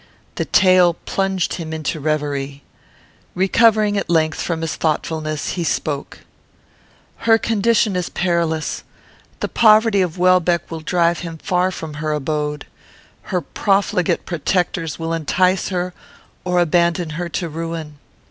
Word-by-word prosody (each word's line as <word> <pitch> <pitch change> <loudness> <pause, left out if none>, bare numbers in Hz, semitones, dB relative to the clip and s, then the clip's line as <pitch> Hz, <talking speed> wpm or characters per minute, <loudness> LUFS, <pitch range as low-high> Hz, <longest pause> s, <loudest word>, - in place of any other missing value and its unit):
The - - -2
tale 185 -2 +4
plunged 195 -1 -1
him 165 -3 -5
into 160 0 -3
reverie. 145 -2 -2 0.7
Recovering, 210 +2 +3
at - - -5
length, 160 -2 +1
from 165 -2 -2
his 165 -1 -2
thoughtfulness, 155 -1 -2
he 175 - -2
spoke: 150 -2 -3 1.0
"Her 225 -1 +4
condition 225 -2 +1
is 180 -1 -2
perilous. 170 -3 -1 0.6
The - - 0
poverty 215 -2 +4
of 180 -1 -2
Welbeck 180 -2 +2
will 165 - -4
drive 170 +1 +1
him 165 -2 -6
far 180 +3 0
from 160 -4 -7
her 155 -1 -1
abode. 150 0 -2 0.6
Her 180 -2 0
profligate 195 +2 0
protectors 170 -1 -1
will 165 0 -3
entice 180 +4 +1
her 180 -1 -2 0.5
or 180 -1 +1
abandon 170 0 +1
her 170 +3 -4
to 170 0 -3
ruin. 160 -2 -6
170 Hz, 130 wpm, -19 LUFS, 155-185 Hz, 1.0 s, tale